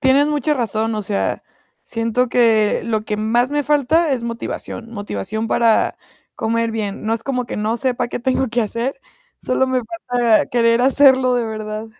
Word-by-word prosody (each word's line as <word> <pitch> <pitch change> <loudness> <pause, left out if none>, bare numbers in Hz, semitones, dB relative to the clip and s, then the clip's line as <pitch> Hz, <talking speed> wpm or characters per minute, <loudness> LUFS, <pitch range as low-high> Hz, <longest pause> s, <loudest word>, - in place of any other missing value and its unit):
tienes 275 +1 +4
mucha 300 0 0
razón. 225 -3 -1
O 215 - -2
sea, 200 0 -2 0.4
siento 230 +2 -1
que 225 -4 +3
lo 220 -2 -1
que 210 -1 -2
más 235 +4 +1
me 295 0 0
falta 295 +2 +2
es 250 -3 -1
motivación. 230 0 -5
Motivación 205 - -4
para 225 -1 +2 0.4
comer 230 +1 -1
bien. 215 -2 -4
No 225 - +1
es 225 - -5
como 250 -1 -2
que - - -5
no 215 +2 -1
sepa 250 -1 -1
qué - - -4
tengo 260 +2 0
que 240 +2 0
hacer 235 +6 -3 0.4
solo 260 +1 +1
me 260 -1 0 0.3
falta 240 -3 +3
querer 230 -1 +2
hacerlo 260 -1 +4
de 240 - 0
verdad. 215 0 -5
235 Hz, 175 wpm, -19 LUFS, 220-260 Hz, 0.4 s, tienes